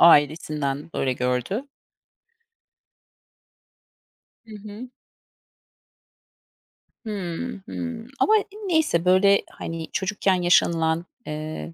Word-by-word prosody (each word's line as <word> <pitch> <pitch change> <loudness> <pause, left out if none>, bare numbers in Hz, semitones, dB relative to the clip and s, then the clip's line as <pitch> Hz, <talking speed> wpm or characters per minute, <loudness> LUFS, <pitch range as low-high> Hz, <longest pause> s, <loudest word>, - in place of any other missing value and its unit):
ailesinden 150 -2 +4
böyle 130 - +1
gördü. 125 - -1 2.8
Hı 220 -1 -11
hı. 210 +4 -9 2.2
Hıı, 205 +2 -4
hıı, 245 -3 -5
ama 435 - +5 0.3
neyse, 315 - +2
böyle, 195 +2 +5
hani, 165 -1 -6
çocukken 195 0 +1
yaşanılan, 165 -1 +3 0.2
eee, 150 - -5
175 Hz, 70 wpm, -24 LUFS, 155-215 Hz, 2.8 s, ama